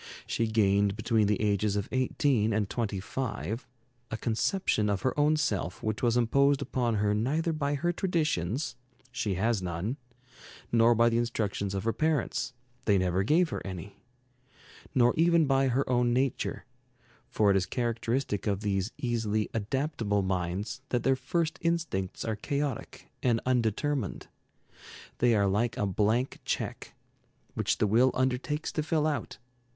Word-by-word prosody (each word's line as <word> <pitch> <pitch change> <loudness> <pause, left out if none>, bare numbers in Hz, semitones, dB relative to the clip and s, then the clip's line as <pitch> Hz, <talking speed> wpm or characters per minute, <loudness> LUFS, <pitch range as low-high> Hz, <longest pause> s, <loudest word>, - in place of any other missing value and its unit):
She 115 - 0
gained, 100 -2 +2
between 110 -2 +2
the 105 -1 +1
ages 105 -1 +1
of 105 0 -1
eighteen 130 -3 +1
and 105 -1 +1
twenty 105 -3 -2
five, 115 - -4 0.4
a 110 - -3
conception 115 - 0
of 100 -2 -1
her 130 - +1
own 150 +1 +3
self 100 - -2
which 110 -1 -2
was 120 -1 +2
imposed 140 +4 +3
upon 125 -5 -1
her 105 0 +1
neither 150 +10 0
by 145 -2 -1
her 175 +5 0
traditions 155 - -1 0.4
she 115 -6 -1
has 110 +2 +1
none; 90 +8 -3 0.7
nor 115 0 +5
by 115 +1 +5
the 115 0 +1
instructions 105 -4 -2
of 95 - -2
her 115 0 0
parents 150 -4 0 0.3
they 100 -2 +4
never 90 0 +1
gave 160 - +3
her - - -4
any; 95 +1 -8 0.9
nor 120 -1 +5
even 170 0 +4
by 135 -1 +3
her 130 +2 +1
own 120 -1 +2
nature 130 0 -1 0.6
for 105 -5 +3
it - - +3
is 95 -1 +1
characteristic 115 -2 -1
of 100 -1 0
these 100 0 -1
easily 110 -3 -1
"adaptable" 115 -2 -1
minds 95 +6 -2
that 125 - 0
their 135 - +3
first 160 +5 -1
instincts 165 - -1
are 110 -1 -1
chaotic 140 +3 -3
and 120 -2 +2
undetermined. 125 0 0 0.9
They 120 -1 +4
are 100 -1 +3
like 110 +4 0
a 105 - +1
blank 110 +6 0
check, - - -4 0.6
which - - 0
the - - +2
will 115 +5 +4
undertakes 130 +4 -1
to 155 - -1
fill 155 0 0
out. 145 -7 -2
115 Hz, 155 wpm, -29 LUFS, 105-135 Hz, 0.9 s, nor